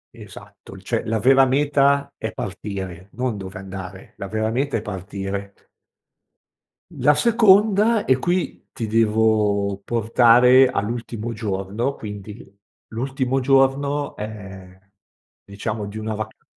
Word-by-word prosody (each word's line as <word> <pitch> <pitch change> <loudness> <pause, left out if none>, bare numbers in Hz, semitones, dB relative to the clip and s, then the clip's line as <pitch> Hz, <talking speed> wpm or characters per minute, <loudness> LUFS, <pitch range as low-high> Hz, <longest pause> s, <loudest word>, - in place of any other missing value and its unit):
Esatto. - - -13
Cioè - - -3
la 110 0 0
vera 135 +5 +5
meta 140 0 +2
è 110 - -3
partire, 95 -2 -6
non 125 -1 -2
dove 95 -1 -8
andare. 95 0 -9
La 100 - -6
vera 110 +2 -1
meta 135 +2 -1
è - - -4
partire. 100 0 -5 1.4
La 145 +3 +3
seconda, 215 +2 +4
e 130 - +3
qui 175 +5 -2
ti 115 - -5
devo 105 -2 +1
portare 120 +3 +5
all'ultimo 115 0 -4
giorno 105 +4 -3
quindi 105 +1 -9 0.4
l'ultimo 130 +2 -2
giorno, 135 +2 +1
ehm, 95 -3 -9 0.7
diciamo 105 +1 -5
di 105 +2 -8
una 110 0 -4
vaca 110 0 -7
110 Hz, 115 wpm, -22 LUFS, 100-135 Hz, 1.4 s, vera